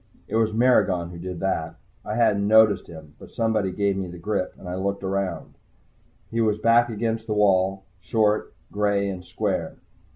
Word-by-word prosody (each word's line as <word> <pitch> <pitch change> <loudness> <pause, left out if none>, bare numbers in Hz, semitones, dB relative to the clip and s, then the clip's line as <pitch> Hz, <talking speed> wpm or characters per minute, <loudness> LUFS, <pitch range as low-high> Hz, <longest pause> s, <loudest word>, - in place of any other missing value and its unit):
It - - -4
was 110 -1 +2
Maragon 105 -7 +2
who 85 - -9
did 90 0 -6
that. 80 -4 -2 0.3
I 105 - -4
hadn't 105 -4 +2
noticed 110 -2 +5
him, 80 -2 -12
but - - -14
somebody 110 -4 0
gave 100 +1 0
me 95 -1 -3
the 90 0 -9
grip, 90 +1 -2
and 90 - -11
I 90 - -4
looked 100 +2 -2
around. 95 0 -3 0.8
He 115 0 0
was 105 -2 +2
back 115 +2 +4
against 115 0 -2
the 105 - -1
wall, 95 -1 +2 0.2
short, 105 0 +1 0.2
gray 100 -1 +1
and 95 -2 -5
square. - - -3
100 Hz, 175 wpm, -24 LUFS, 95-110 Hz, 0.8 s, noticed